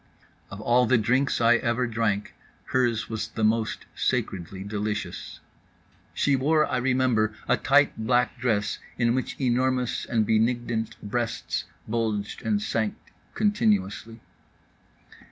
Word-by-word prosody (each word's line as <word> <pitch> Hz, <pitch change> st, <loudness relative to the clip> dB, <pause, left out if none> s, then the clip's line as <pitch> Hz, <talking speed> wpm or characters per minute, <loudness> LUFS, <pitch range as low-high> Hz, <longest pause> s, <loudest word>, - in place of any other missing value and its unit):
Of 95 Hz, -, -8 dB
all 120 Hz, +2 st, +3 dB
the 130 Hz, -, +4 dB
drinks 125 Hz, +5 st, +1 dB
I 120 Hz, +1 st, +5 dB
ever 120 Hz, +1 st, 0 dB
drank, 110 Hz, -3 st, -1 dB, 0.4 s
hers 115 Hz, -4 st, +1 dB
was 110 Hz, -1 st, -3 dB
the 110 Hz, -, -4 dB
most 110 Hz, 0 st, +1 dB
sacredly 95 Hz, +1 st, -2 dB
delicious. 105 Hz, -2 st, -4 dB, 0.7 s
She 140 Hz, -, +2 dB
wore, 150 Hz, +4 st, +3 dB
I 130 Hz, -, -1 dB
remember, 125 Hz, -4 st, +1 dB
a -, -, +4 dB
tight 145 Hz, +1 st, +3 dB
black 125 Hz, +2 st, +1 dB
dress 105 Hz, -4 st, 0 dB, 0.2 s
in 120 Hz, -1 st, +2 dB
which 130 Hz, 0 st, -3 dB
enormous 130 Hz, -1 st, 0 dB
and 110 Hz, -3 st, +1 dB
benignant 115 Hz, 0 st, 0 dB
breasts 115 Hz, +2 st, -2 dB, 0.2 s
bulged 110 Hz, -2 st, -2 dB
and 210 Hz, -1 st, +1 dB
sank 110 Hz, -, -1 dB, 0.4 s
continuously. 115 Hz, -, 0 dB
115 Hz, 120 wpm, -26 LUFS, 110-125 Hz, 0.7 s, I